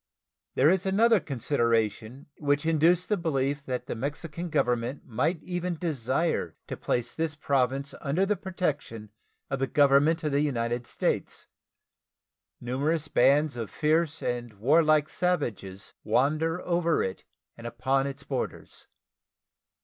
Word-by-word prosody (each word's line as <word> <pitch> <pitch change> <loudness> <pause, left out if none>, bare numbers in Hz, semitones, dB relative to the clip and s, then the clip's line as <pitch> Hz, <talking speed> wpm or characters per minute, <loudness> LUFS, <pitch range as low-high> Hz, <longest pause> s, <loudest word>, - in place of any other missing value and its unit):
There 145 +5 +5
is 190 0 0
another 220 +3 +4
consideration 115 - -1
which 145 +1 +1
induced 165 +3 +3
the 210 - +1
belief 140 -4 -1
that 125 -1 -3
the - - -4
Mexican 155 +7 -5
Government 125 -1 -1
might 155 +9 -1
even 180 -1 -3
desire 140 - -1
to - - -5
place 120 -1 -2
this 160 -2 -2
Province 140 -1 0
under 155 +7 +1
the 210 +1 +1
protection 145 - -4 0.4
of 135 - -1
the 135 - 0
Government 145 +4 +4
of 150 - 0
the 140 +1 +2
United 120 -4 -1
States. - - -2 1.1
Numerous 145 +6 -1
bands 145 +1 +3
of 115 -3 -4
fierce 160 0 0
and 120 -2 -3
warlike 150 +7 +3
savages 105 - -2
wander 155 +9 +1
over 170 -2 +1
it 95 - -4 0.3
and 115 0 -8
upon 135 +3 0
its 140 0 -7
borders. 135 -3 -5
145 Hz, 130 wpm, -27 LUFS, 125-165 Hz, 1.1 s, There